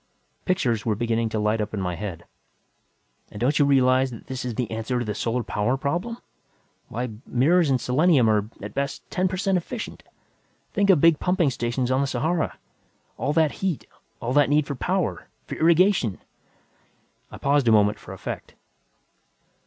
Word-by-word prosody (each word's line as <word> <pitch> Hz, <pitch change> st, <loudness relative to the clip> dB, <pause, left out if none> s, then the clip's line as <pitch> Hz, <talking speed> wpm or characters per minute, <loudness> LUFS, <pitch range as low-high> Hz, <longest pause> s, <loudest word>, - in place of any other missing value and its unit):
Pictures 125 Hz, -, +1 dB
were 110 Hz, -2 st, 0 dB
beginning 115 Hz, 0 st, 0 dB
to 110 Hz, -, -3 dB
light 105 Hz, +1 st, +1 dB
up 105 Hz, -, -3 dB
in -, -, -3 dB
my 90 Hz, -2 st, -2 dB
head. 85 Hz, -3 st, -6 dB, 1.0 s
"And 105 Hz, -, -9 dB
don't 140 Hz, +7 st, +1 dB
you 145 Hz, -, +5 dB
realize 130 Hz, -1 st, +4 dB
that 115 Hz, -3 st, -10 dB
this 130 Hz, -1 st, -5 dB
is 125 Hz, -3 st, -4 dB
the 120 Hz, -2 st, -2 dB
answer 115 Hz, +3 st, -2 dB
to 120 Hz, -, -2 dB
the 105 Hz, -, -2 dB
solar 115 Hz, +3 st, -1 dB
power 115 Hz, +5 st, 0 dB
problem? 175 Hz, -, -2 dB, 0.7 s
Why, 120 Hz, +2 st, -3 dB, 0.2 s
mirrors 155 Hz, +6 st, +3 dB
and 130 Hz, -2 st, +2 dB
selenium 135 Hz, 0 st, +3 dB
are, 105 Hz, -1 st, +2 dB
at -, -, -6 dB
best, 140 Hz, 0 st, -3 dB
ten 185 Hz, 0 st, +1 dB
per 185 Hz, 0 st, -3 dB
cent 190 Hz, -1 st, +1 dB
efficient! 210 Hz, +6 st, -7 dB, 0.7 s
Think 200 Hz, 0 st, +2 dB
of 175 Hz, -7 st, +6 dB
big 165 Hz, -2 st, +5 dB
pumping 180 Hz, -5 st, +2 dB
stations 120 Hz, +1 st, -1 dB
on 130 Hz, +1 st, +2 dB
the 140 Hz, -, 0 dB
Sahara! 160 Hz, +4 st, -1 dB, 0.6 s
All 145 Hz, -, 0 dB
that 160 Hz, -2 st, +3 dB
heat, 185 Hz, -6 st, -1 dB, 0.3 s
all 120 Hz, +1 st, -2 dB
that 145 Hz, -2 st, +4 dB
need 150 Hz, 0 st, +3 dB
for 145 Hz, -, -4 dB
power, 115 Hz, -9 st, -2 dB, 0.2 s
for -, -, -7 dB
irrigation!" 170 Hz, -, +3 dB, 1.1 s
I -, -, -10 dB
paused 140 Hz, -2 st, +2 dB
a -, -, +6 dB
moment 105 Hz, -1 st, +4 dB
for -, -, -11 dB
effect. -, -, -7 dB
130 Hz, 175 wpm, -24 LUFS, 115-160 Hz, 1.1 s, of